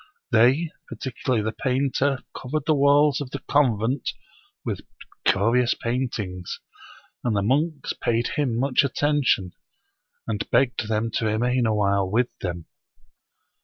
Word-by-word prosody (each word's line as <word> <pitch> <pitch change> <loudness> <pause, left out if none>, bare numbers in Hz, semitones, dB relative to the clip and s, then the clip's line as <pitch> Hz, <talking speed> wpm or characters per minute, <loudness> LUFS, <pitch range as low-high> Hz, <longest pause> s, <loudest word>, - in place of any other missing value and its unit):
They, 130 +8 +4 0.2
particularly 125 -3 -2
the 110 - -1
painter, 135 +2 0
covered 140 +3 -3
the 155 - +3
walls 145 0 +4
of 140 - -5
the 140 - -4
convent 130 -3 +1 0.5
with - - -2 0.5
curious 115 +5 +3
paint 125 +1 -2
ings; 90 -4 -5 0.6
and 120 -3 0
the 100 - +1
monks 145 +6 0
paid 120 0 0
him 130 -6 -1
much 130 +2 +3
attention, 140 -9 +1 0.7
and 105 -2 -3
begged 120 -2 +2
them 110 +1 -1
to 110 - -1
remain 120 +3 +1
awhile 100 -3 +1
with 120 +5 0
them. 85 -3 -4
125 Hz, 130 wpm, -24 LUFS, 110-140 Hz, 0.7 s, They